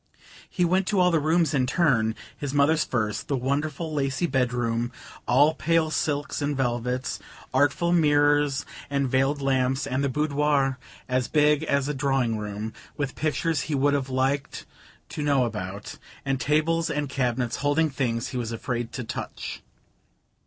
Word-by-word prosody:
He 180 - +1
went 185 +2 +2
to 205 -3 +1
all 180 0 +5
the 165 - +3
rooms 160 0 +2
in 130 -3 +2
turn: 125 -8 +2 0.2
his 145 -1 -4
mother's 150 +2 +4
first, 110 -6 -2
the 140 - 0
wonderful 145 +5 -2
lacy 140 +3 0
bedroom, 120 -4 0 0.4
all 145 +5 +5
pale 160 0 +1
silks 145 -1 -1
and 145 -1 -1
velvets, 125 0 -1 0.3
artful 145 +6 +2
mirrors 145 -3 +3 0.2
and 140 -1 0
veiled 135 +3 +1
lamps, 130 0 +1
and 135 0 -1
the 140 - +1
boudoir 145 -1 +1 0.3
as 130 -1 0
big 150 -1 +3
as 140 -2 +1
a 150 - -1
drawing 135 -5 0
room, 105 +1 -5 0.2
with 140 -3 -2
pictures 160 +1 0
he 150 - +1
would 140 +1 +2
have 135 -2 -1
liked 135 +2 -1 0.4
to - - -5
know 140 -3 +3
about, 100 -3 -6 0.3
and 135 -1 0
tables 165 +3 +1
and 150 -2 -1
cabinets 125 -3 -1
holding 145 +2 +1
things 120 -3 -1
he 130 - -4
was 115 -2 -3
afraid 120 +1 -3
to 125 - -4
touch. 115 - -6
140 Hz, 160 wpm, -26 LUFS, 125-150 Hz, 0.4 s, all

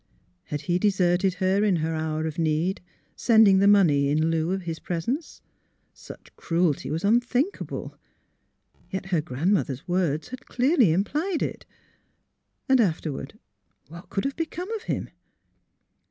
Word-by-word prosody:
Had 145 -1 -4
he 175 0 0
deserted 185 -2 +2
her 190 +2 +1
in 205 -4 +3
her 160 0 -1
hour 155 0 -2
of 160 0 -4
need, 165 +4 0 0.3
sending 220 -5 +5
the 200 - +4
money 160 -9 +4
in 155 +3 +1
lieu 160 0 0
of 190 0 -2
his 165 -1 -5
presence? 235 - -4 0.5
Such - - -13
cruelty 165 -3 0
was 160 +3 -3
unthinkable. 245 - 0 0.9
Yet 190 -1 -4
her 180 -5 0
grand 160 +5 0
mother's 140 -8 -2
words 175 -4 0
had 255 0 -9
clearly 255 - +3
implied 300 - 0
it. - - -5 1.0
And 265 -3 +5
after 165 -6 0
ward 135 - -8 0.3
— - - -43
what 170 +2 -12
could 195 - -2
have 275 - -2
become 345 +4 -4
of 445 -2 -3
him - - -2
185 Hz, 150 wpm, -25 LUFS, 160-220 Hz, 1.0 s, sending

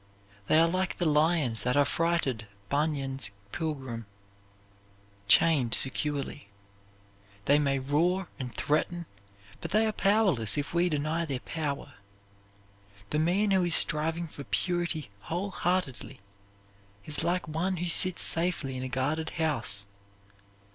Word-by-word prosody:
They - - +4
are 165 +1 +5
like 185 +2 -1
the 175 - -1
lions 150 -6 +2
that 125 +3 0
affrighted 145 -6 +1 0.2
Bunyan's 140 -4 -1 0.2
pilgrim 130 -9 -4 1.2
chained 135 -7 +4
securely. 145 -1 -1 1.0
They 145 +1 +4
may 140 -2 +1
roar 170 +8 0
and 125 -2 -5
threaten, 170 +6 -1 0.5
but - - -6
they 215 +1 +3
are 220 - +1
powerless 195 - +2
if 145 +1 -3
we 175 +1 +2
deny 155 +2 -1
their 135 -5 -3
power. 145 -3 -4 1.2
The 150 - +1
man 190 +6 +2
who 190 -1 +3
is 175 -2 +6
striving 160 +2 +3
for 145 -3 -9
purity 175 - -2
whole 180 - -3
heartedly 175 - -2 0.9
is 150 -1 -4
like 180 +1 0
one 175 +4 -1
who 175 - -2
sits 185 +1 +5
safely 165 -6 -1
in 130 - -4
a 130 - -4
guarded 150 +5 -1
house. 150 -11 -1
155 Hz, 125 wpm, -29 LUFS, 140-175 Hz, 1.2 s, is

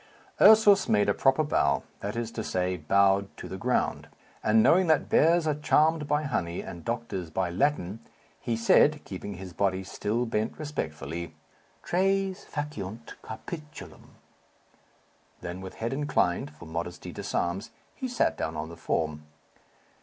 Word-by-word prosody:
Ursus 210 -2 +7
made 105 - +3
a - - +4
proper 135 +7 +3
bow 70 - +1 0.2
that 100 +2 -4
is 115 -1 -3
to 110 - -4
say, 90 -1 -1
bowed 95 +4 +3
to - - -7
the - - -6
ground; - - -1 0.4
and 110 +1 +4
knowing 180 +2 +5
that 155 -1 +2
bears 170 +1 +4
are 155 - +2
charmed 150 +1 +2
by 150 +1 +1
honey, 90 - -2
and 85 -1 -9
doctors 115 -7 -3
by 90 +2 -1
Latin, 110 -2 0 0.4
he 115 -1 -2
said, 145 +6 +4
keeping 100 +1 -6
his 90 0 -9
body 95 0 0
still 110 +5 -2
bent 110 -1 -2
respectfully, 85 - -5 0.5
"Tres 195 +1 0
faciunt 115 -7 -5
capitulum!" 150 +7 -9 1.3
Then, 90 +2 -6
with 95 -1 -8
head 115 +3 -3
inclined 110 - 0
(for 85 - -12
modesty 85 +2 -5
disarms) 95 +6 -2 0.2
he 260 - -4
sat 245 -1 +1
down 80 0 -3
on 80 +1 -4
the 85 - -10
form. 75 -2 -2
110 Hz, 145 wpm, -28 LUFS, 90-150 Hz, 1.3 s, Ursus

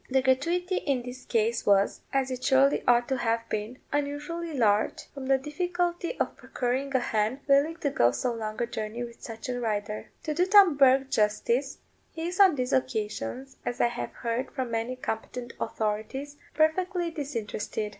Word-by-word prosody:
The 265 0 +2
gratuity 340 +8 +1
in 265 -4 0
this 250 +1 -9
case 230 0 +1
was, 200 0 +3
as 270 -1 0
it 255 0 -4
surely 270 +1 +4
ought 240 0 +4
to 265 - +1
have 230 -1 0
been, 215 +4 -3
unusually 295 +4 -2
large, 215 -7 +1
from 275 -2 -6
the 270 0 +4
difficulty 345 - -2
of - - -1
procuring 265 +2 -2
a - - +5
hen 225 +2 0
willing 285 +4 +4
to 285 - 0
go 120 - +4
so 125 - -1
long 215 -2 -5
a 240 - +1
journey 225 +1 -4
with 235 -1 -10
such 225 +4 -7
a 250 -1 -2
rider. 210 -2 -3
To 305 - -1
do 355 +4 +2
Tom 390 -5 +7
Bourke 270 -1 +4
justice, 235 +5 +1 0.4
he 325 +1 -3
is 360 +2 -5
on 380 -5 +7
these 255 -1 -1
occasions, 250 - -2
as 245 - -3
I 240 - +4
have 240 - -5
heard 235 +2 -2
from 260 -4 -4
many 230 +2 -1
competent 240 0 -5
authorities, 220 +7 -3 0.2
perfectly 345 +2 +1
disinterested. 225 -7 -3
260 Hz, 175 wpm, -28 LUFS, 230-290 Hz, 0.4 s, Tom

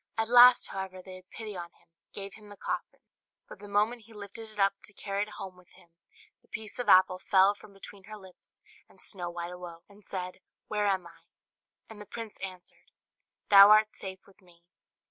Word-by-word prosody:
At 225 0 0
last, 245 0 +8
however, 190 -1 -6
they 190 - -10
had 185 0 -19
pity 215 -3 -8
on 175 -1 -6
him, - - -30 0.2
and - - -62
gave 200 -1 -8
him 210 -1 -15
the 205 - -12
coffin; - - -5 0.5
but - - -12
the 205 - -11
moment 215 +3 0
he 230 - -16
lifted 210 +2 -9
it 215 - -15
up 195 -1 +3
to 210 - -13
carry 200 0 -3
it 210 - -2
home 190 -1 -8
with 180 -1 -21
him, 170 - -21 0.5
the - - -31
piece 215 +2 -8
of 245 -4 -2
apple 185 -1 +6
fell 190 +1 +4
from 205 - -16
between 195 0 -13
her 215 +1 -9
lips, 190 -3 -15 0.3
and - - -22
Snow 180 -4 -2
White 175 0 -6
awoke, 175 -2 -10
and 205 +1 -19
said, 185 -2 -6 0.3
"Where 210 -1 0
am 190 -3 0
I?" 170 -1 -15 0.7
And 215 -2 -12
the 205 - -11
prince 225 0 -7
answered, 185 -2 -8 0.6
"Thou 200 0 +10
art 215 0 +5
safe 190 -1 -8
with 200 +1 -23
me." 175 -2 -23
200 Hz, 210 wpm, -29 LUFS, 185-210 Hz, 0.7 s, Thou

